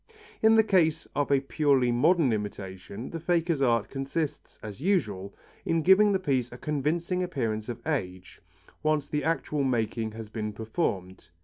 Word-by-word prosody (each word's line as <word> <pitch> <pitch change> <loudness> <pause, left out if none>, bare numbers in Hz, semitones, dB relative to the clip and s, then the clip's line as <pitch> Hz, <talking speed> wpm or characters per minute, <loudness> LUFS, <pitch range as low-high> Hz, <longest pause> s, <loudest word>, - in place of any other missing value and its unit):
In 220 0 +6
the 220 - +6
case 165 -6 +2
of 145 -1 0
a 140 -1 +4
purely 135 -3 +2
modern 150 +1 +3
imitation, 100 +1 -6
the 165 - -4
faker's 170 -2 0
art 115 -5 +2
consists, 140 +3 -4
as 105 +3 -8
usual, 105 - 0 0.3
in 165 -1 0
giving 200 +4 +6
the 195 - +3
piece 135 -9 -1
a 125 - -9
convincing 155 +6 -1
appearance 115 -11 -2
of 120 - -7
age, 95 - -4 0.4
once 155 -2 +1
the 150 -1 -2
actual 150 -2 0
making 115 -3 -1
has 110 0 -7
been 105 -1 -4
performed. 100 - -3
135 Hz, 155 wpm, -28 LUFS, 110-165 Hz, 0.4 s, In